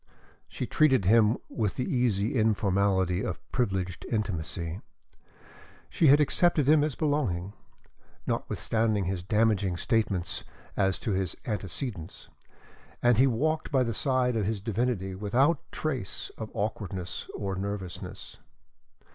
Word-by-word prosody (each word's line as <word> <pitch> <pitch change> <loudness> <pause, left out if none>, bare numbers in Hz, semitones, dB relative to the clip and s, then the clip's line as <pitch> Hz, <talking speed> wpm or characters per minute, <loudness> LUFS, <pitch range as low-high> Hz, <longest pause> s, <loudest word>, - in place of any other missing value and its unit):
She - - -4
treated 135 -10 +3
him 110 +2 +5
with 105 -5 -2
the 125 - -2
easy 120 - +1
informality 100 -4 +2
of - - -3
privileged 95 -7 -1
intimacy. 90 -4 -3 1.1
She 160 - +3
had 145 +2 +7
accepted 150 -1 +3
him 150 0 +6
as 150 -3 -1
belonging, 110 - -1 0.7
notwithstanding 110 -3 0
his 95 0 -2
damaging 100 -2 +1
statements 100 -5 0 0.3
as 95 -2 +2
to 110 - -1
his 95 -2 -1
antecedents, 100 - -4 0.7
and 120 -1 +4
he 135 - +6
walked 155 +7 0
by 135 -2 +3
the 115 -2 -2
side 125 +1 +1
of 105 -3 0
his 110 -1 -1
divinity 105 -2 -1
without 120 - +2
a - - -38
trace 130 -11 -3
of 110 -1 -6
awkwardness 95 -4 -4
or 100 -1 -3
nervousness. 95 -2 -6
105 Hz, 125 wpm, -28 LUFS, 95-125 Hz, 1.1 s, had